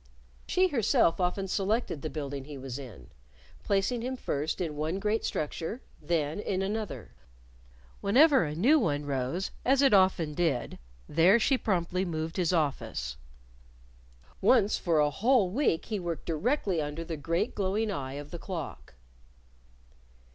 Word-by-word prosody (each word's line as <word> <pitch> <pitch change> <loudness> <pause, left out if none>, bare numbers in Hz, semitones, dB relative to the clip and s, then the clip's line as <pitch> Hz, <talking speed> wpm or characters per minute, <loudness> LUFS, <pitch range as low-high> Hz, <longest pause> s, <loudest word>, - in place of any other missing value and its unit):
She 370 0 +3
herself 235 - +2
often 185 +2 0
selected 200 - -1
the 155 - -3
building 140 -3 -5
he 145 -1 -8
was 130 0 -6
in, 125 -8 -11 0.5
placing 200 +4 0
him 255 +2 -3
first 150 - -2
in 165 -5 -3
one 155 +5 -2
great 210 +2 0
structure, 165 - -3 0.2
then 155 +1 -1
in 195 -2 -1
another. 205 - -4 0.9
Whenever 265 +6 +5
a 150 -1 -3
new 265 - +4
one 145 - 0
rose, 140 +6 -2
as 270 +2 +3
it 270 - +5
often 185 -5 +3
did, 150 -6 -1 0.3
there 175 +7 +5
she 270 - +3
promptly 185 -5 0
moved 160 -2 -3
his 180 -2 +1
office. 140 - -1 1.3
Once 210 0 +4
for 170 -3 0
a 150 -1 +3
whole 220 - +3
week 215 - +1
he 215 -3 -3
worked 170 -3 -4
directly 190 - 0
under 150 +2 -4
the 165 -1 -4
great 165 +8 -1
glowing 205 +2 0
eye 135 -6 -4
of 145 +1 -8
the 170 - -6
clock. 165 - -7
175 Hz, 145 wpm, -29 LUFS, 150-210 Hz, 1.3 s, Whenever